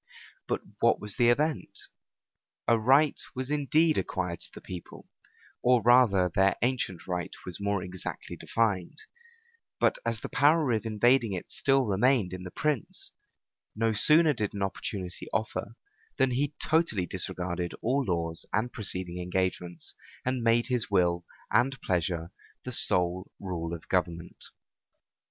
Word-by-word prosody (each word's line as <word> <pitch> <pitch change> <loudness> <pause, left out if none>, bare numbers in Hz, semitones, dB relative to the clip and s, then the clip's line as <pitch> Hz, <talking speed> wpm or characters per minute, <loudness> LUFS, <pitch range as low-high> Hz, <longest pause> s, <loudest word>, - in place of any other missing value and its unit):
But - - -1 0.2
what - - +3
was 105 -1 -6
the 120 -2 +4
event? 150 +5 0 0.9
A 115 - +5
right 135 +6 +3
was 130 +2 -4
indeed 150 +2 +2
acquired 90 -3 -3
to - - -8
the - - -10
people, 90 -2 -9 0.5
or 125 0 +4
rather 120 -7 +5
their 95 0 +3
ancient 120 -8 -1
right 90 -1 -3 0.2
was 90 0 -5
more 100 -2 0
exactly 90 -1 -6
defined; 110 - -1 0.8
but - - +2
as 115 -2 -1
the - - -4
power 145 0 +3
of 110 0 0
invading 115 0 +3
it 90 - -6
still 135 -1 +2
remained 105 -1 +2
in 90 - -6
the 90 - -7
prince, 150 +5 -2 0.6
no 115 +1 +1
sooner 155 +8 +7
did 105 -5 -3
an 100 - -2
opportunity 95 -1 -4
offer, 105 +2 -3 0.4
than 135 -2 +3
he 140 +4 -1
totally 155 - +2
disregarded 90 -1 -3
all 135 +4 +1
laws 85 -5 -2
and 110 +4 -1
preceding 90 -4 -4
engagements, 90 -1 -2 0.3
and 130 -1 0
made 115 0 +3
his 125 -3 0
will 85 -3 +2 0.3
and 135 +3 +2
pleasure 85 -1 -1 0.3
the - - -4
sole 90 +1 +2
rule 85 -4 -4
of 85 -1 -7
government. 85 -2 -2
105 Hz, 140 wpm, -28 LUFS, 90-125 Hz, 0.9 s, sooner